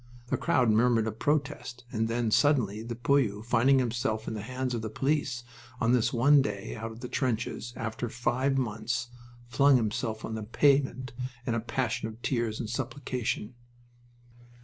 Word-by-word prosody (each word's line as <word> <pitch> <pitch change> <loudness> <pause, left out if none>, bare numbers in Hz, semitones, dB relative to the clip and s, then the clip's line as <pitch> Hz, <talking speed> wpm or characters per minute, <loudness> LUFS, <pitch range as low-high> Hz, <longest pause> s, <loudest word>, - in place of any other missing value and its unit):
The - - +2
crowd 125 -4 +3
murmured 115 0 +3
a 110 - -1
protest, 140 0 -2
and 110 -2 0
then 115 -1 0
suddenly 115 -7 +3
the 115 +1 -5
poilu, 120 -4 +1
finding 125 +3 +4
himself 115 -3 -1
in - - -2
the 110 - -4
hands 130 +3 -3
of 115 - -2
the 110 - -4
police, 135 0 -1 0.4
on 115 - +2
this 125 -3 +3
one 140 +4 +5
day 100 -5 -4
out 115 0 -5
of 110 +1 -11
the 125 - -4
trenches 120 -2 -2
after 115 +1 -3
five 130 +3 0
months 115 0 -2 0.4
flung 140 +3 +5
himself 110 -1 -1
on 110 - -5
the 110 - -3
pavement 130 +3 +2 0.3
in 120 - 0
a 115 - +1
passion 120 0 -2
of 110 0 -9
tears 115 -4 -1
and 115 - -3
supplication. 125 -2 -3
120 Hz, 170 wpm, -29 LUFS, 110-130 Hz, 0.4 s, one